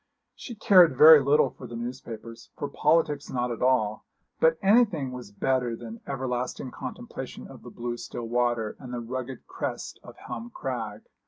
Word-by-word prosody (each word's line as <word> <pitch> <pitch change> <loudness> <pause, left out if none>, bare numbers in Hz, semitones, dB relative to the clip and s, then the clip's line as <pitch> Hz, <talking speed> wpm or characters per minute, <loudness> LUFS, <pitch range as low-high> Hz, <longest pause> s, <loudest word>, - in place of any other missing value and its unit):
She 240 - -9
cared 180 -9 +6
very 155 +1 +10
little 140 +2 +3
for 125 - -11
the 120 - -8
newspapers, 115 -1 -7
for 145 - -3
politics 150 0 +1
not 125 -1 -1
at 115 - -5
all; 125 -5 +2 0.4
but 160 0 +4
anything 200 - +3
was 125 -5 -8
better 125 +3 0
than 115 0 -9
everlasting 125 -1 -3
contemplation - - -7
of - - -13
the - - -10
blue 120 0 -5
still 120 0 -6
water, 120 -2 0
and 125 -3 -9
the 125 - -3
rugged 130 +2 -6
crest - - -5
of - - -13
Helm 120 -1 -7
Crag. 110 -5 -5
125 Hz, 165 wpm, -27 LUFS, 120-140 Hz, 0.4 s, very